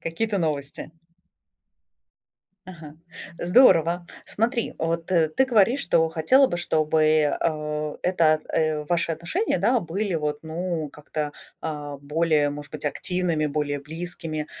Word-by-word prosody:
Какие-то 200 +5 -2
новости. 150 -2 -3 1.7
Ага, 160 -5 -11 0.4
здорово. 175 -4 +4 0.2
Смотри, 235 +2 -1
вот 165 0 -2
ты 170 +6 +2
говоришь, 240 +2 +3
что 165 -10 +2
хотела 165 - +4
бы, 175 - -3
чтобы, 155 -2 +2
а, 150 -1 -2
эта, 160 -4 +3
э, 155 -2 0
ваши 170 -1 +1
отношения, 170 - -1
да, 235 +7 +2
были 185 +3 -2
вот, 150 -2 -1
ну, 160 -1 -3
как-то, 150 0 -5 0.3
а, 150 -2 -5
более, 150 0 +1
может 145 0 -8
быть, 150 -1 -8
активными, 165 0 -1
более 145 -1 -2
близкими. 160 0 -5
160 Hz, 120 wpm, -24 LUFS, 150-175 Hz, 1.7 s, здорово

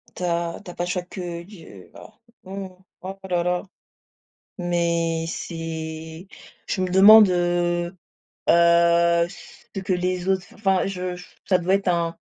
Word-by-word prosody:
Tu - - -6
as 170 -1 -1
tu 180 - -8
as - - -14
pas 175 - -2
chaque 180 +1 -4
d 170 -1 -5
j 160 - -13
voilà - - -14 0.3
mmh 195 +1 -6
mh. - - -14 0.3
Oh 190 +1 -7
là 175 -1 +1
là, 180 0 0 1.0
mais 170 -2 0
c'est 160 0 -6 0.4
je 185 - -1
me 185 - -1
demande, 205 +3 +8
heu, 175 0 0 0.5
heu, 170 0 +4
ce 195 +1 -11
que 190 0 -2
les 180 0 -1
autres 190 -2 0
enfin 195 -3 +1
je 180 -2 -4 0.3
ça 185 - +4
doit 180 +2 +1
être 195 -1 0
un 170 -1 0
175 Hz, 150 wpm, -23 LUFS, 170-185 Hz, 1.0 s, demande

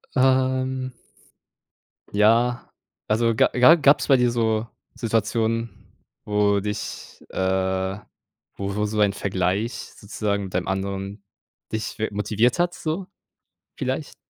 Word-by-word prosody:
Ähm 130 0 +2 1.2
Ja, 115 +4 +3 0.4
also, 115 +1 +2
ga - - +4
ja, 125 +6 +7
gab's 145 -3 +4
bei 135 - +6
dir 125 -1 +2
so 110 -1 0 0.3
Situationen, 115 0 -1 0.3
wo 105 -1 +2
dich 105 +1 -6
äh, 95 0 0 0.6
wo 100 0 -4
wo 105 0 0
so 105 0 -2
ein 100 -1 +3
Vergleich 95 +4 -1 0.2
sozusagen 100 -1 -2
mit 95 - -8
einem 90 - -1
anderen 95 +1 -3 0.5
dich 110 0 -4
wi 110 - 0
motiviert 110 - +1
hat, 175 0 +2
so 170 +2 -3 0.7
vielleicht? - - -3
110 Hz, 120 wpm, -23 LUFS, 100-125 Hz, 1.2 s, ja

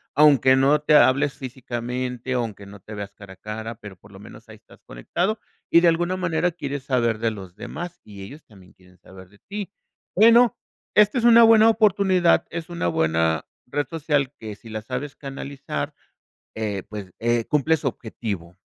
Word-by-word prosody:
Aunque 140 -3 +6
no 135 +3 +4
te 150 0 +3
hables 140 +1 +4
físicamente, 125 -1 -5
aunque 115 -5 -3
no 100 0 -12
te 105 - -11
veas 100 -1 -7
cara 100 -2 -13
a - - -17
cara, 110 +2 -6
pero, 105 -3 -11
por 100 +3 -19
lo 95 - -13
menos 105 - -14
ahí - - -12
estás - - -21
conectado 180 - -2 0.3
y 170 - +6
de 175 - +4
alguna 175 +2 0
manera 175 -1 0
quieres 145 -5 -5
saber 120 -4 0
de 115 0 0
los 95 -4 -10
demás, 175 - -7
y 100 -2 -11
ellos 145 +11 -11
también 95 -4 -19
quieren 90 -1 -23
saber 95 0 -15
de 100 +1 -23
ti. 200 -1 -7 0.4
Bueno, 230 +4 +6 0.4
esta 210 +3 +5
es - - -4
una 235 -1 +8
buena 225 -1 +7
oportunidad, 195 -5 +3
es 165 0 -6
una 170 - -2
buena 80 -1 0 0.2
red 145 +1 -2
social 145 -4 -1
que 110 -2 -7
si 115 - -15
la 110 0 -5
sabes 130 +5 -5
canalizar, 140 +1 -6 0.6
eh, 105 -3 -3
pues, 100 -4 -8
eh, 120 0 +1
cumple 150 +2 +2
su 150 -2 -2
objetivo. 100 -8 -6
130 Hz, 185 wpm, -23 LUFS, 105-165 Hz, 0.6 s, una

